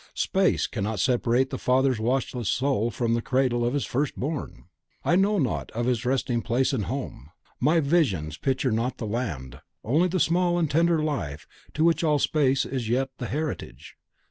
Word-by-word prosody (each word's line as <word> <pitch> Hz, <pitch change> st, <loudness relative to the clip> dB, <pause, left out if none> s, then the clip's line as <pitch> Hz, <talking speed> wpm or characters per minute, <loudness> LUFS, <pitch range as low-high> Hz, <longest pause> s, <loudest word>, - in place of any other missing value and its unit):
Space 190 Hz, -1 st, +1 dB
cannot 105 Hz, -1 st, -3 dB
separate 125 Hz, +3 st, +2 dB
the 130 Hz, -, -4 dB
father's 130 Hz, -1 st, +2 dB
watchful 125 Hz, +1 st, -1 dB
soul 120 Hz, +3 st, +1 dB
from 115 Hz, -1 st, -1 dB
the 115 Hz, -, +1 dB
cradle 130 Hz, -2 st, +1 dB
of 120 Hz, +3 st, 0 dB
his 145 Hz, -, 0 dB
first 140 Hz, +3 st, -1 dB
born! 145 Hz, +2 st, -4 dB, 0.4 s
I 175 Hz, -, +3 dB
know 200 Hz, +3 st, +3 dB
not 135 Hz, -9 st, -1 dB
of 120 Hz, +1 st, -2 dB
its 125 Hz, 0 st, 0 dB
resting 125 Hz, -2 st, 0 dB
place 125 Hz, +4 st, 0 dB
and 110 Hz, -7 st, -1 dB
home, 125 Hz, -, -5 dB, 0.3 s
my 155 Hz, +6 st, +3 dB
visions 130 Hz, -, +1 dB
picture 130 Hz, -1 st, 0 dB
not 115 Hz, +4 st, -1 dB
the 115 Hz, -, -5 dB
land, 80 Hz, -, -4 dB, 0.2 s
only 155 Hz, +10 st, +2 dB
the 185 Hz, +1 st, -1 dB
small 175 Hz, +1 st, +2 dB
and 160 Hz, -4 st, 0 dB
tender 165 Hz, +1 st, +3 dB
life 85 Hz, -, -3 dB, 0.3 s
to 155 Hz, -, +1 dB
which 170 Hz, 0 st, +3 dB
all 150 Hz, -2 st, +3 dB
space 140 Hz, -2 st, +2 dB
is -, -, -8 dB
as 110 Hz, -, -5 dB
yet 130 Hz, +3 st, 0 dB
the 125 Hz, -, -3 dB
heritage! 150 Hz, +4 st, -5 dB
130 Hz, 185 wpm, -26 LUFS, 115-150 Hz, 0.4 s, I